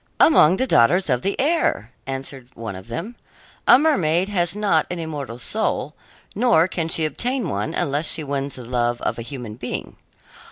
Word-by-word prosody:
"Among 185 - +6
the 260 - +1
daughters 175 - +3
of 125 -1 +1
the 195 - -2
air," 275 - +1 0.2
answered 135 -1 -5
one 110 -4 -6
of 95 +2 -10
them. 170 - -6 0.5
"A - - +9
mermaid 190 - +2
has 175 -3 0
not 200 -7 +2
an 180 - -3
immortal 145 -7 -5
soul, 150 - -1 0.4
nor 210 -7 +3
can 170 -3 -2
she 160 -1 +1
obtain 245 - -2
one 105 -3 -3
unless 145 +3 0
she 160 - -1
wins 140 -1 -3
the 125 - -9
love 120 0 0
of - - -1
a - - -3
human 120 -3 -7
being. 125 0 -6
155 Hz, 175 wpm, -22 LUFS, 125-195 Hz, 0.5 s, A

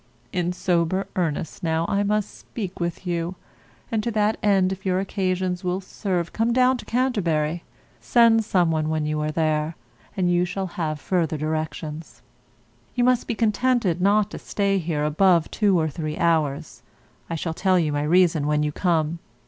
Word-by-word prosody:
In 180 -1 0
sober 180 +1 0
earnest 160 -4 -2
now 165 -1 0
I 200 - +1
must 210 0 -1
speak 195 -5 -7
with 170 +2 -3
you; 175 0 -2 0.6
and 220 -2 +1
to 235 - -2
that 215 -1 +1
end 195 -3 +3
if 190 0 -6
your 185 -1 +1
occasions 185 -1 -1
will 180 +1 -1
[serve] 185 -3 -3
come 230 +1 +1
down 255 +1 +4
to - - -10
Canterbury. 175 -11 0 0.4
Send 230 -2 +4
some 180 -5 +2
one 155 -1 0
when 155 -1 -1
you 150 0 -1
are 150 - -1
there, 155 0 0 0.4
and 185 -2 +2
you 175 0 +3
shall 190 +2 -3
have 155 -3 -2
further 165 -2 0
directions. 155 0 -4 0.7
You 245 - +2
must 250 -1 +2
be 235 - -1
contented 220 -5 +1
not 205 +2 +3
to - - -7
stay 200 -1 0
here 160 -3 -2
above 165 +2 +3
two 200 -5 +2
or 160 - +1
three 155 0 -4
hours. 150 -6 0 0.5
I 165 - -2
shall 165 0 -3
tell 185 +2 +2
you 160 -4 +1
my 145 - 0
reason 160 -1 +3
when 150 0 +2
you 150 - 0
come. 165 -1 0
175 Hz, 175 wpm, -24 LUFS, 160-200 Hz, 0.7 s, down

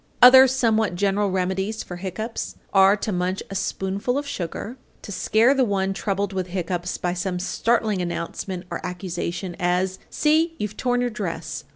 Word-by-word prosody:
Other 260 +1 +10
somewhat 225 -6 +1
general 200 +2 +1
remedies 190 +3 -1
for 180 - -8
hiccoughs 195 +5 -5 0.2
are 195 +1 +6
to 210 - -3
munch 180 +1 -1
a - - -5
spoonful 200 +6 -1
of 290 - -2
sugar, 215 0 -5 0.3
to - - -7
scare 225 +6 +3
the 270 -2 +2
one 195 -3 0
troubled 200 0 -2
with 185 -1 -2
hiccoughs 180 0 -3
by 175 -1 -1
some 180 0 -2
startling 215 +2 0
announcement 175 +1 -4
or - - -4
accusation, 180 0 -4
as, 180 +1 0
"See, 320 +2 +2
you've 210 0 -4
torn 245 +1 0
your 245 -1 0
dress!" 170 -8 -5
195 Hz, 165 wpm, -23 LUFS, 180-220 Hz, 0.3 s, Other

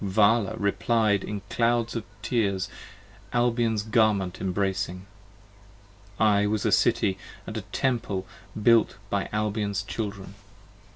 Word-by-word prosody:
35 95 -1 -4
Vala 110 0 +4
replied 105 0 +1
in 105 -1 -4
clouds 115 +1 +1
of 115 - -2 0.2
tears 100 -6 0 0.6
Albion's 115 -3 +1
garment 105 -4 +1
embracing. 95 -1 -2 1.1
I 105 -1 +4
was 105 0 -1
a - - +2
City 95 -1 +2
& - - -20
a - - -6 0.2
Temple 115 -8 -1 0.3
built 115 -2 +4
by 100 -1 -1
Albion's 105 -1 -1
Children! 100 -3 -5
105 Hz, 115 wpm, -26 LUFS, 100-115 Hz, 1.1 s, Vala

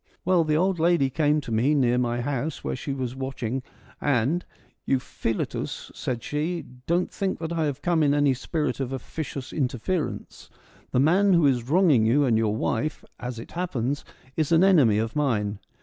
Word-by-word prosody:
Well, 180 -2 +4
the 155 -1 +1
old 185 +1 +1
lady 165 -5 +3
came 150 +1 +2
to 130 - -8
me 125 +7 +2
near 125 -3 +3
my 120 -1 0
house, 145 +3 -3
where - - -2
she 135 +2 -5
was 130 -2 -3
watching, 130 -2 -3 0.4
and 145 +5 +1 0.2
' - - -38
Euphiletus,' 130 -4 -2
said 120 -3 -4
she, 160 +4 -2
' 125 0 -23
don't 175 +2 +1
think 195 -2 -2
that 165 +1 -4
I 165 -2 0
have 145 -1 -3
come 170 -2 +2
in 145 -1 +3
any 145 -2 +3
spirit 150 +4 -2
of 135 -2 -2
officious 135 +1 -5
interference: 145 +5 -3 0.4
the - - +1
man 185 +8 +4
who 170 -3 +4
is 125 -3 +1
wronging 155 - +4
you 140 +5 +4
and 120 -4 +3
your 110 -1 +1
wife, 125 +6 -2
as 125 -1 -5
it 115 - -9
happens, 145 -6 -2 0.3
is 155 -1 0
an 165 +2 +5
enemy 145 - +5
of 110 +1 -2
mine. 105 -9 0
140 Hz, 185 wpm, -25 LUFS, 125-160 Hz, 0.4 s, an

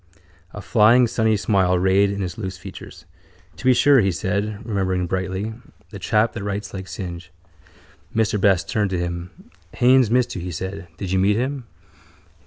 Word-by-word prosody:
A 105 - -9
flying 115 +4 +5
sunny 110 -2 +1
smile 95 -3 +2
rayed 95 +2 +3
in 100 0 -3
his 90 -2 -4
loose 95 -4 -5
features. 85 - -11 0.5
—To 90 - -11
be 130 - +6
sure, 140 +2 +5
he 95 -1 +1
said, 100 +4 -3
remembering 95 -4 -1
brightly. 95 +4 -3 0.4
The 100 - -8
chap 110 +2 +1
that - - -6
writes 100 0 -4
like 95 -1 -6
Synge. 90 -2 -7 0.8
Mr 105 -2 +1
Best 95 -4 +3
turned 105 -2 0
to 95 - -2
him. 85 0 -4 0.5
—Haines 130 -2 +4
missed 120 +1 +1
you, 90 - -4
he 90 - -5
said. 95 +2 -6
Did 95 -1 -5
you 95 - +2
meet 100 +2 +3
him? 130 +2 -2
100 Hz, 175 wpm, -22 LUFS, 95-110 Hz, 0.8 s, be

